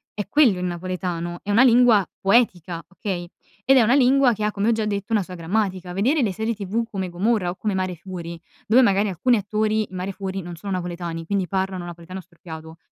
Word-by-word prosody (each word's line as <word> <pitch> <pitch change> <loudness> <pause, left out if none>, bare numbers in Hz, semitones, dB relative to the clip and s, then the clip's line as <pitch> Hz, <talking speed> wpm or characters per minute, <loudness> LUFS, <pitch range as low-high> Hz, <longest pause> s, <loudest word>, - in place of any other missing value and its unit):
è 205 - -4
quello 245 -5 +4
il 180 - -3
napoletano, 175 -1 -4
è 205 - -3
una 215 +4 +5
lingua 240 -4 +6 0.2
poetica, 185 -6 +1
okay, 185 -3 -5 0.3
ed 270 +3 +5
è - - +7
una 230 +3 +3
lingua 270 -1 +4
che 215 -1 -4
ha, 210 - +1
come 205 +2 0
ho - - +4
già 220 -1 0
detto, 205 +1 -3
una 215 - +3
sua 185 -1 -8
grammatica. 185 +1 -2
Vedere 255 - +2
le 205 -4 0
serie 220 +3 -2
tv 210 +3 -2
come 190 -2 -3
Gomorra, 190 +1 0
o - - -8
come 210 0 -2
Mare 185 -1 -2
Fuori, 170 -1 -8 0.2
dove 235 +4 +5
magari 200 -3 +3
alcuni 230 +7 +2
attori 215 +1 0
in 185 - -10
Mare 185 +2 -4
Fuori 195 0 -4
non 175 0 -8
sono 195 +5 -7
napoletani, 175 -2 -4
quindi 195 -1 0
parlano 190 -1 -2
napoletano 175 +2 -8
storpiato. 160 -2 -11
195 Hz, 215 wpm, -23 LUFS, 175-215 Hz, 0.3 s, è